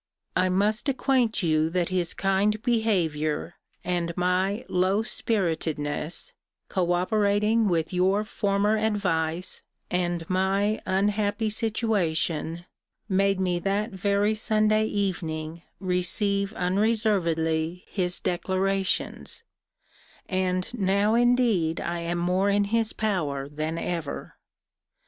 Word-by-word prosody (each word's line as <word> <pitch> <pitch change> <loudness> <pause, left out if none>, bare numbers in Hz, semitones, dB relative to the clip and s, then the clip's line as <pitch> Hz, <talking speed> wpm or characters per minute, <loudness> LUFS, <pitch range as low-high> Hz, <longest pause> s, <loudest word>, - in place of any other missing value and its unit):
I 185 0 +3
must 210 +8 +1
acquaint 255 -5 +1
you 155 -1 +2
that 175 0 0
his 180 -2 -1
kind 195 +2 +1
behaviour, 175 - 0 0.3
and 170 -1 -2
my 185 +4 0
low 190 +4 +1
spiritedness, 160 -8 -1 0.4
co 175 -2 +1
operating 210 +4 +2
with 170 -2 0
your 190 +3 +2
former 205 0 +1
advice, 185 -5 -1 0.3
and 175 -2 -1
my 195 +3 +1
unhappy 205 +2 +1
situation, 175 -7 0 0.4
made 195 -1 +2
me 180 -2 0
that 200 +5 -1
very 200 +2 +1
Sunday 215 0 +2
evening 165 -6 -3 0.2
receive 195 +2 0
unreservedly 180 -5 +1
his 180 -3 -1
declarations: 190 - -1 0.8
and 185 +1 -1
now 200 -1 +2
indeed 235 -9 +3
I 170 0 -3
am 170 +1 -2
more 180 +3 +1
in 205 0 +3
his 225 +2 +1
power 155 -10 -1
than 155 +3 -3
ever. 165 -4 -4
190 Hz, 105 wpm, -26 LUFS, 175-210 Hz, 0.8 s, I